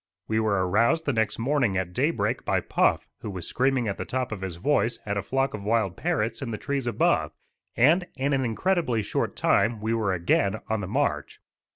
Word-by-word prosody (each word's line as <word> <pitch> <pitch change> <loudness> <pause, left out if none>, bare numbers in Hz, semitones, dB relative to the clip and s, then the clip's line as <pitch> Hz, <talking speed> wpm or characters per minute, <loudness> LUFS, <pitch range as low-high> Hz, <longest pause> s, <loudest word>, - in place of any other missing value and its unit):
We 110 0 +1
were 100 -4 +1
aroused 115 - +2
the 145 - +1
next 110 -2 0
morning 125 -5 +1
at 90 -1 -2
daybreak - - 0
by - - +1
Puff - - +1
who - - -6
was 90 -4 -5
screaming 130 -2 +1
at 100 - -3
the - - -1
top 130 -2 -3
of 105 -3 -5
his 95 -3 -4
voice 115 +3 +1
at 100 -1 -2
a 100 - 0
flock 135 +6 -1
of 105 - -5
wild 105 -4 +1
parrots 160 -11 -1
in 135 - -4
the 110 - -3
trees 140 -1 -2
above, 115 - +1 0.4
and 165 +9 +4
in 140 +1 0
an 135 -1 +1
incredibly 125 - 0
short - - -2
time 115 -1 +2
we 110 +2 -1
were 110 -4 0
again 95 +3 +1
on 110 -1 0
the 95 - -4
march. 105 - -1
115 Hz, 210 wpm, -26 LUFS, 100-135 Hz, 0.4 s, and